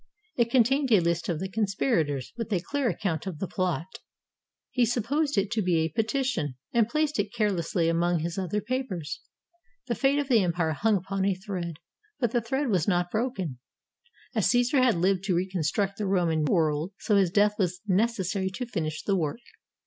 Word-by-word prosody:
It 235 -1 +1
con 250 -2 +6
tained 270 +2 0
a 210 - +7
list 170 0 0
of 165 -3 -1
the 190 - -3
conspirators, 195 - 0
with 230 -2 -5
a 190 - +2
clear 275 +7 -1
account 185 -6 -2
of 180 -5 -4
the 195 - -3
plot. 180 -3 -1 0.9
He 250 - +2
supposed 250 +5 0
it 195 +1 +1
to 225 -2 +1
be 180 -3 +2
a 160 0 +1
petition, 220 - -1 0.2
and 230 -2 +3
placed 305 -2 0
it 205 0 0
carelessly 185 -6 0
among 170 +1 +2
his 170 +1 -3
other 190 +3 -1
papers. 210 - -3 0.6
The 240 - -1
fate 275 +3 +2
of 290 -2 0
the 235 -5 +4
empire 170 -2 0
hung 210 +6 +2
upon 195 +1 -3
a 195 -1 +2
thread, 180 -4 -5 0.4
but 240 -4 +1
the 240 - +1
thread 265 +4 -1
was 185 -7 +1
not 175 -2 +1
broken. 205 - -2 0.7
As - - +2
Caesar 245 +2 +3
had 255 -5 +4
lived 185 +2 +1
to 190 -3 +1
reconstruct 190 +2 -1
the 210 - -1
Roman 170 -5 +1
world, 155 +3 +1
so 210 - +1
his 195 -3 +4
death 205 +3 +3
was 180 -1 0
necessary 195 -2 +1
to 250 - -3
finish 160 -9 -3
the 200 - +1
work. 165 +5 -2
195 Hz, 190 wpm, -27 LUFS, 170-235 Hz, 0.9 s, a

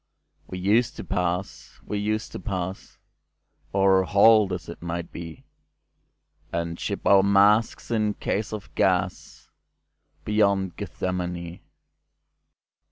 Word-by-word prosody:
We 95 - -6
used 110 +6 +2
to - - -7
pass—we 90 +2 -3
used 110 +1 -2
to - - -6
passOr 95 0 -2
halt, 105 +1 +5
as 90 -1 -5
it 85 - -9
might 85 0 -5
be, 85 -2 -9 1.1
And 85 0 -3
ship - - -4
our 100 -1 +6
masks 100 +4 +3
in 110 -2 +1
case 105 +1 -2
of 105 -2 -7
gasBeyond 100 -3 -2
Gethsemane. 90 -2 -4
95 Hz, 100 wpm, -25 LUFS, 90-105 Hz, 1.1 s, our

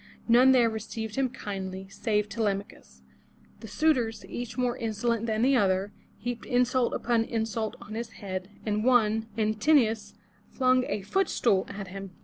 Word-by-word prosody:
None 245 +3 +6
there 250 -3 +5
received 220 0 -5
him 270 -1 +1
kindly, 190 -5 -6
save 210 +1 0
Te 225 +3 -5
lem'a 200 -2 +1
chus. 65 0 -19 0.6
The 225 - -9
suitors, 250 -6 +1
each 245 +1 -6
more 250 -1 +1
insolent 230 +1 -1
than 220 0 0
the 270 +2 +4
other, 195 -3 +1 0.2
heaped 245 +2 -5
insult 250 0 +2
upon 235 -2 +1
insult 225 -1 -2
on 215 - -10
his 225 0 -5
head, 185 -2 -6 0.2
and 210 -1 0
one, 225 -3 +3
An 215 -1 +1
tin'o 230 +1 +4
us, 210 -2 -8 0.3
flung 255 -1 +2
a 200 - -3
foot 385 - +1
stool 195 -5 +2
at 200 -1 -7
him. 195 +1 -7
225 Hz, 170 wpm, -28 LUFS, 205-245 Hz, 0.6 s, None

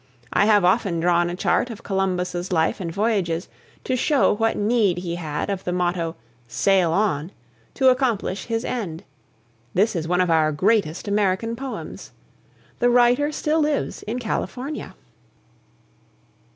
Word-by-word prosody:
I - - +4
have 205 -4 +4
often 185 -2 +2
drawn 175 0 +2
a 175 - -4
chart 245 - +1
of 225 - -9
Columbus's 180 -2 -2
life 160 +3 +1
and 170 -3 -4
voyages 195 -4 0 0.4
to 255 - -1
show 280 +2 +3
what 225 +2 0
need 210 -4 +2
he 175 -1 -4
had 160 +2 -3
of 195 -1 -4
the 180 - -2
motto 175 -2 -1 0.3
"Sail 180 +8 +2
On!" 175 -4 0 0.4
to 265 -1 +5
accomplish 240 -7 0
his 230 0 -2
end. 190 -8 -4 0.7
This 205 +3 +2
is 165 -2 -2
one 180 +1 +1
of 180 -2 +2
our 155 -1 +3
greatest 185 +1 +1
American 205 +2 0
poems. 265 +2 -7 0.7
The 245 - +3
writer 245 +4 +4
still 305 +1 0
lives 300 -1 -1
in 225 +4 -4
California. 250 +4 -4
195 Hz, 145 wpm, -23 LUFS, 175-230 Hz, 0.7 s, to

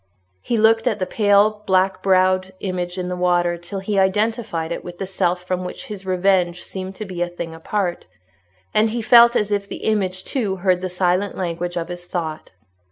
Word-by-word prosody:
He 235 - -1
looked 225 +2 +4
at 220 -4 +1
the 185 - -1
pale 210 +1 +3
black 190 0 +2
browed 185 0 +2
image 180 -1 -3
in 180 -1 -3
the 180 - -3
water 175 -1 +2
till 175 +3 -7
he 195 +1 -1
identified 205 -3 0
it - - -4
with 175 0 -9
that 195 - -3
self 180 -1 -1
from 185 0 -2
which 180 - -7
his 195 -2 -8
revenge 180 -1 +1
seemed 190 0 -6
to 215 - -6
be 185 -3 -6
a 175 - +1
thing 170 -1 -6
apart; 175 - -3 0.7
and 220 +1 +3
he 230 +1 -3
felt 235 +1 +7
as 210 -2 +1
if 200 -1 0
the - - -7
image 190 -4 0
too 210 -7 -2
heard 185 -1 +1
the 185 - -3
silent 180 +2 0
language 175 -1 -3
of 170 0 -3
his 175 0 -7
thought. 160 -3 -4
185 Hz, 200 wpm, -21 LUFS, 175-205 Hz, 0.7 s, felt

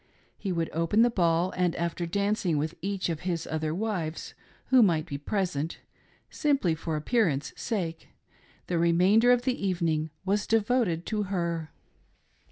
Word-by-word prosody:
He 195 - -4
would 165 -2 -1
open 165 +8 +3
the 240 - +3
ball, 175 -2 +1
and, 180 -2 +1
after 170 0 -2
dancing 200 -3 0
with 155 +2 -1
each 195 0 -2
of 165 -3 -2
his 175 -2 -2
other 155 -1 -2
wives 175 -4 -3 0.4
who 260 -1 +7
might 165 -7 +3
be 140 -5 -5
present 165 -2 -2 0.3
— - - -34
simply 280 - +1
for 160 0 -3
appearance 155 - 0
sake 175 -8 -3 0.3
— - - -31
the 175 -2 -1
remainder 185 +8 +4
of 245 -1 +3
the 255 -5 -1
evening 165 -5 0 0.2
was 205 +2 0
devoted 220 -6 +1
to 215 -2 -1
her. 170 -4 -2
175 Hz, 160 wpm, -28 LUFS, 165-205 Hz, 0.4 s, who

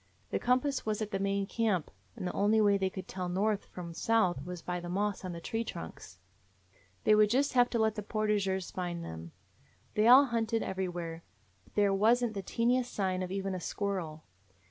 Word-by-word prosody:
The - - 0
compass 255 +3 +1
was 215 -1 -1
at 210 - -6
the 195 - -1
main 200 0 0
camp, 210 -6 0 0.2
and - - -6
the 180 - -2
only 210 +2 +3
way 205 -2 +5
they 190 -1 +1
could 190 -1 -8
tell 180 -1 -4
north 205 +3 0
from 170 -2 -8
south 185 -7 +1
was 180 0 -7
by 180 0 -3
the 175 0 -7
moss 200 +2 -1
on 185 - -4
the 170 - -6
tree 225 +7 -2
trunks. 85 - -8 0.9
They 215 - +5
would 210 0 +5
just 270 +5 +2
have 245 -1 +4
to 235 - -1
let 220 -1 +2
the 210 - -4
portageurs 205 -3 -1
find 175 -2 -4
them. 80 0 -8 0.6
They 215 +1 +3
all 260 +4 +9
hunted 230 -2 0
everywhere, 175 -3 -4 0.4
but - - -25
there 205 -1 +3
was 225 +5 +4
n't 230 -2 -1
the 200 - -3
teeniest 245 +5 +1
sign 185 -2 -1
of 185 - -3
even 195 0 -2
a 185 - -3
squirrel. 175 -6 -3
200 Hz, 205 wpm, -31 LUFS, 180-220 Hz, 0.9 s, all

